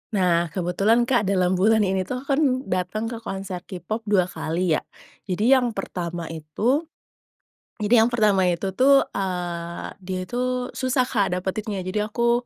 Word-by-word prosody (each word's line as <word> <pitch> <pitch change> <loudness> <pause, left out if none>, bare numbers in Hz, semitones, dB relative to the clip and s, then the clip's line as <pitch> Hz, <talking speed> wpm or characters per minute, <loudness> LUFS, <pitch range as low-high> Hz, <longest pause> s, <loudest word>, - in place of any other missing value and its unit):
Nah, 175 -3 +2
kebetulan 190 +8 +1
Kak 240 -4 +1
dalam 185 -2 +2
bulan 220 +2 +4
ini 190 -1 0
itu, 255 - -3
aku 270 +3 -5
kan 275 +3 +3 0.2
datang 190 +4 -2
ke 230 - -5
konser 195 -4 -5
K-pop 210 +4 -5
2 200 -3 +4
kali 175 0 -2
ya. - - -19 0.5
Jadi 205 +6 +1
yang 245 -4 +3
pertama 175 -3 -4
itu, 215 - -1 0.9
jadi 220 +2 +5
yang 240 - -2
pertama 210 -5 +3
itu 180 +2 0
tuh, 270 +8 +5
eee, 175 -3 -4 0.2
dia 185 0 -3
itu 250 +4 -2
susah 260 0 0
Kak 200 -7 +1
dapetinnya, 195 +2 -3
jadi 195 +3 -1
aku, 235 +1 +2
195 Hz, 160 wpm, -24 LUFS, 180-235 Hz, 0.9 s, jadi